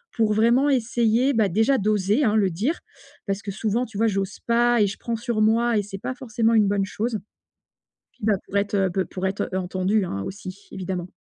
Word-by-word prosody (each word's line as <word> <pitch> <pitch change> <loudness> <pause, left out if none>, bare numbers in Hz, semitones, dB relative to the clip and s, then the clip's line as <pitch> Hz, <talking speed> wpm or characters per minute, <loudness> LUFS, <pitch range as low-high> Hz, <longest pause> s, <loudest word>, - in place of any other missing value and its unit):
pour 220 -2 +2
vraiment 235 +6 +3
essayer, 245 0 +2
bah, 220 -4 +2
déjà 225 +9 +2
d'oser 210 +4 +1
hein, 220 -4 +2
le 200 -3 +3
dire, 225 - -1 0.5
parce 195 0 -2
que 200 - -4
souvent 220 +4 -1
tu 220 -4 -10
vois 225 +2 +3
j'ose 195 -2 -2
pas 240 0 +3
et 205 - +4
je 195 - -5
prends 235 - -3
sur 235 -2 -2
moi 230 +2 +3
et 205 - +1
c'est 195 0 -7
pas 255 - -4
forcément 230 -3 0
une 210 -2 +4
bonne 200 -1 +1
chose, 220 +2 -3 0.9
puis - - -21
bah 215 - +4
pour 200 - -3
être, 200 +1 -1
heu, 195 -1 +2
peu 190 0 -1
pour 190 0 -3
être 190 - -2
entendu 185 +3 0
hein, 100 - -4
aussi 195 - -8
évidemment. 185 -2 -4
215 Hz, 215 wpm, -24 LUFS, 195-235 Hz, 0.9 s, et